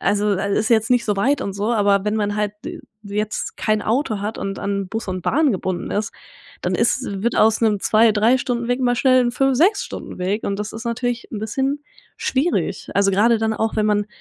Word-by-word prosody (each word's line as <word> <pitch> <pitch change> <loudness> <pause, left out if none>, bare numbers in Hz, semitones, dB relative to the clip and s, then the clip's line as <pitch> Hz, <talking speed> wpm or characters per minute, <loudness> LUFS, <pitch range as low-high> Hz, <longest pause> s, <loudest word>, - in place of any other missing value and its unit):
also, 205 +2 +1
al 200 0 0
ist 220 +2 0
jetzt 225 +1 +3
nicht 245 -1 +3
so 210 -2 0
weit 270 +7 +1
und 195 -5 -4
so, 210 +4 -1
aber 200 -2 +2
wenn 210 +1 0
man 205 -1 -1
halt 210 -1 -1
d 340 - -6 0.2
jetzt 210 +1 -3
kein 215 -1 0
Auto 220 -3 0
hat 210 +2 -4
und 195 0 -4
an 200 -1 -2
Bus 225 0 -5
und 185 -1 -3
Bahn 300 +2 +2
gebunden 185 -2 -3
ist, 210 +2 -2 0.5
dann - - -1
ist - - +1 0.2
wird 235 - 0
aus 220 +1 +4
'nem 210 -3 +2
2, 220 0 +4
3 225 +5 +3
Stunden 240 -1 -2
Weg 245 +1 +1
mal 245 -1 +2
schnell 255 0 +4
'n 240 0 0
5, 270 0 +2
6 390 - +3
Stunden - - -8
Weg, 200 +4 -1
und 200 - -1
das 210 - -5
ist 225 +2 -7
natürlich 235 +1 -2
'n 210 - -4
bisschen 270 +6 -2 0.3
schwierig. 285 +7 -1
Also, 200 0 +3
grade 225 +4 +3
dann 220 0 0
auch, 220 0 -1
wenn 215 0 +2
man 205 -1 +1
220 Hz, 230 wpm, -21 LUFS, 205-245 Hz, 0.5 s, aus